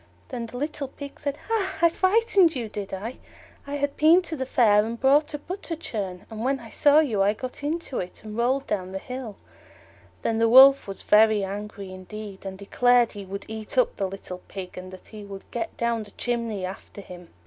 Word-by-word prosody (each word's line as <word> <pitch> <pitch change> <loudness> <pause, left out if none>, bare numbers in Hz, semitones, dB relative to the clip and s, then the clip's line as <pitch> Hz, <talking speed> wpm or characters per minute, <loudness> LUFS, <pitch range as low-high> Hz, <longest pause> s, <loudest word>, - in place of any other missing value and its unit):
Then 240 -3 -4
the 245 - -8
little 290 0 -3
Pig 280 +1 -10
said, 285 0 -3
"Hah! 390 -6 0
I - - +7
frightened 380 -3 +3
you, 235 -4 -3
did 205 -2 -6
I? 215 +6 -5 0.5
I 285 - -3
had 285 0 -1
been 330 +4 +6
to 330 -2 -5
the 260 -3 -4
Fair 210 -5 +4
and 230 +1 -5
bought 290 +3 +3
a - - -2
butter 350 +2 -5
churn, 195 - -5
and 220 0 -5
when 270 +2 +1
I 230 -2 -11
saw 290 +5 +4
you 225 -10 0
I 200 +1 +4
got 255 +5 -7
into 305 -2 -2
it, 180 - -7
and 215 -1 -8
rolled 255 +4 +1
down 185 -2 -3
the - - -2
hill." 250 0 -7 0.9
Then 225 0 0
the 230 0 +4
Wolf 270 +2 +8
was 195 -1 -6
very 215 -1 +5
angry 200 0 -6
indeed, 195 +1 -8
and 190 0 -6
declared 240 +4 +3
he 200 -2 -8
would 200 +1 -7
eat 220 +2 -6
up 250 - +3
the 195 - 0
little 185 -1 -8
Pig, 190 -2 -8
and 185 0 -8
that 185 0 -11
he 215 -2 -9
would 195 -1 -9
get 230 -1 -4
down 235 -1 0
the 210 - -10
chimney 230 -4 -2
after 195 +2 -8
him. 180 -2 -11
230 Hz, 215 wpm, -25 LUFS, 200-275 Hz, 0.9 s, Wolf